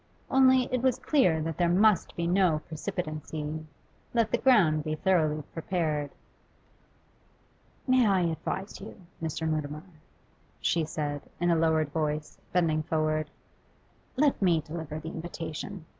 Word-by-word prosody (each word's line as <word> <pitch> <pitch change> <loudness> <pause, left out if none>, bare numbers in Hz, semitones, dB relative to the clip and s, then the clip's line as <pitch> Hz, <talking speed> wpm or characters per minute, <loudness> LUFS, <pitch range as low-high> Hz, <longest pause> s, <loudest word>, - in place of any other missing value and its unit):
Only, 260 -1 +6
it 255 - +1
was 260 -1 +2
clear 180 - +2
that 165 0 -4
there 175 -1 +3
must 200 +2 +3
be 170 - -2
no 175 -3 +3
precipitancy. 155 -2 -4 0.5
Let 230 -2 +2
the - - +1
ground 180 - +4
be 155 0 -2
thoroughly 155 -4 +1
prepared. 160 -4 -1 1.8
'May 255 -3 +4
I 195 -2 +3
advise 175 +4 -3
you, 205 - -10 0.2
Mr. 160 0 -2
Mutimer?' 155 -1 -2 0.8
she 165 -2 +1
said, 145 -2 -3 0.2
in 175 0 +2
a - - +4
lowered 160 -2 +2
voice, 150 0 -3
bending 165 -3 +2
forward. 155 -1 0 0.9
'Let 280 -2 +2
me 170 -4 +3
deliver 155 -1 -6
the 160 +1 -6
invitation. 165 +2 -6
160 Hz, 130 wpm, -28 LUFS, 155-190 Hz, 1.8 s, Only